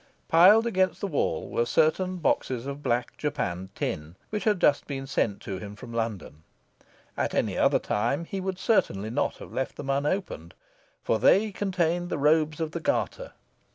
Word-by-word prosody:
Piled 195 +7 +7
against 190 -5 +1
the - - -2
wall 165 -8 -1
were 120 - 0
certain 170 +8 +1
boxes 130 -7 0
of 140 +1 -5
black 120 -2 -1
japanned 95 - -3
tin, 75 +3 -4 0.2
which 210 -1 -3
had 210 -4 +2
just 145 -3 +3
been 135 -2 -4
sent 110 -6 -1
to 95 -2 -5
him 105 +1 -8
from 115 +2 -10
London. 110 - -4 0.7
At - - -1
any - - 0
other - - +3
time 140 +10 -1
he 195 +3 -4
would 190 0 -3
certainly 110 - +1
not 140 +5 0
have - - -11
left 130 - -2
them 140 -1 -3
unopened. 140 - -2 0.5
For 110 - +1
they 210 - +4
contained 175 -3 -1
his 155 - -2
robes 155 +1 +2
of 160 -1 -2
the 170 - -4
Garter. - - -2
150 Hz, 175 wpm, -27 LUFS, 115-185 Hz, 0.7 s, Piled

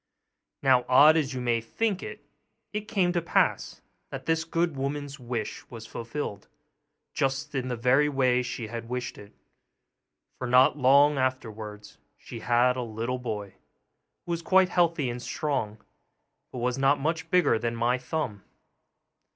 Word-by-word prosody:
Now 130 -2 +4
odd 145 +5 +7
as 145 -4 0
you - - -3
may 120 -2 +1
think 200 - -2
it - - -8 0.5
it 210 0 -4
came 185 -5 +1
to 175 - +1
pass 170 - 0 0.3
that - - -7
this 165 0 0
good 165 -1 0
woman's 140 +1 -4
wish 120 -3 -4
was 115 -2 -9
fulfilled, 115 -3 -6 0.7
just 135 +2 -1
in 130 -2 -2
the 125 - -2
very 130 +5 +3
way 130 -3 +2
she 120 -2 -5
had 115 +1 -7
wished 125 0 -4
it; 105 0 -13 1.1
for, 125 - -3
not 125 +3 +5
long 140 +1 +5
afterwards, 110 -5 -4 0.2
she 115 - -9
had 125 +2 +2
a - - -1
little 115 +2 -3
boy, 105 -5 -5 0.7
who 175 - -5
was 170 0 -1
quite 185 +2 +4
healthy 170 -5 +1
and 120 0 -4
strong, 125 -6 -2 0.7
but - - -8
was 125 +2 -1
not 135 +2 +3
much 160 +3 -2
bigger 175 -10 +3
than 115 0 -2
my 120 +2 +1
thumb. 125 -6 -4
130 Hz, 155 wpm, -27 LUFS, 120-150 Hz, 1.1 s, odd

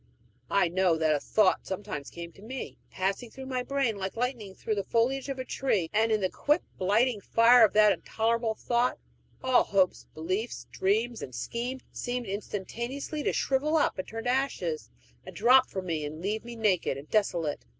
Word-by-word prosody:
I 200 -3 +3
know 180 -1 +2
that 160 -1 +2
a 150 - +1
thought 210 +5 +2
sometimes 190 -7 -5
came 170 0 -8
to 195 - -18
me, 255 +5 -7
passing 195 +5 -2
through 265 +3 -9
my 255 -1 -2
brain 255 -4 0
like 190 0 -4
lightning 235 -6 -3
through 220 - -2
the 200 -2 -1
foliage 255 +7 0
of 270 - -3
a 260 - -4
tree; 205 -14 0
and 220 +1 +3
in 215 -1 +2
the 190 - +2
quick, 295 +4 +1 0.2
blighting 210 +4 +2
fire 230 +3 +6
of 215 - +5
that 210 0 +6
intolerable 225 +2 0
thought, 240 +2 0 0.5
all 260 -1 +4
hopes, 190 -2 +1
beliefs, 185 +9 -3
dreams, 220 +5 0
and 130 - -7
schemes 245 - -4
seemed 245 0 -3
instantaneously 235 +9 -4
to - - +1
shrivel 290 +4 +1
up 290 - +1
and 185 - -4
turn 225 0 -6
to 245 - +1
ashes, 220 - -1 0.3
and - - -11
drop 255 +4 +5
from 190 -1 -5
me, 160 -4 -2
and 150 +1 -6
leave 210 +3 -1
me 240 0 -8
naked 200 -10 +1
and 140 +2 -10
desolate. 175 -8 0
220 Hz, 190 wpm, -28 LUFS, 190-250 Hz, 0.5 s, fire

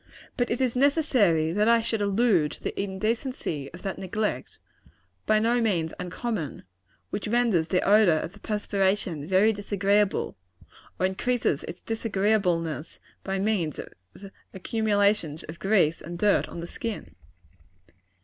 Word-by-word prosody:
But 245 -2 0
it 235 - -1
is 255 -2 +1
necessary 250 - +3
that 210 +3 +2
I 235 0 +6
should 225 -1 -1
allude 200 -6 +2
to - - -13
the - - -2
indecency 200 - -3
of 170 - -12
that 195 - -4
neglect 210 +3 -3 0.7
by 215 - +4
no 235 +3 +2
means 175 -8 0
uncommon 180 - -4 0.5
which 205 - -3
renders 220 -8 +2
the 180 - 0
odor 205 -5 +5
of 160 - -4
the 205 - -15
perspiration 195 -7 -1
very 195 +4 +4
disagreeable, 200 0 0 0.6
or 185 - +2
increases 190 - 0
its 175 +2 -8
disagreeableness 195 -8 -1 0.2
by 195 0 -2
means 190 -6 0
of - - -7 0.7
accumulations 205 -6 +1
of 165 +2 -9
grease 190 -6 +2
and 170 +2 -7
dirt 205 +2 +2
on 170 - -7
the - - -5
skin. 205 - -6
200 Hz, 140 wpm, -26 LUFS, 175-220 Hz, 0.7 s, I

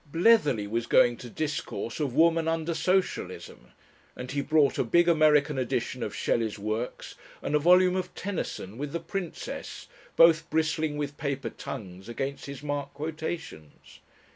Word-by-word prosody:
Bletherley 165 - +4
was 115 +2 -2
going 120 0 +5
to 120 - -9
discourse 145 -3 -4
of 140 -5 -2
"Woman 165 0 +4
under 165 0 0
Socialism," 180 +4 -2 0.5
and 125 - -7
he 140 +1 -1
brought 150 -1 +2
a - - +3
big 170 +9 +3
American 150 -3 +4
edition 125 - -2
of - - -4
Shelley's 110 -2 0
works 110 +4 -4 0.3
and - - -2
a 150 - +4
volume 180 +3 +5
of 185 -1 -3
Tennyson 145 - -5
with 145 0 -4
the 170 - -1
"Princess," 180 0 -6 0.3
both 165 -1 +5
bristling 160 -1 0
with 145 -1 -4
paper 140 -6 -3
tongues 95 0 -8
against 135 +4 -4
his 140 0 -8
marked 145 -1 -4
quotations. 155 - -7
150 Hz, 150 wpm, -28 LUFS, 125-165 Hz, 0.5 s, going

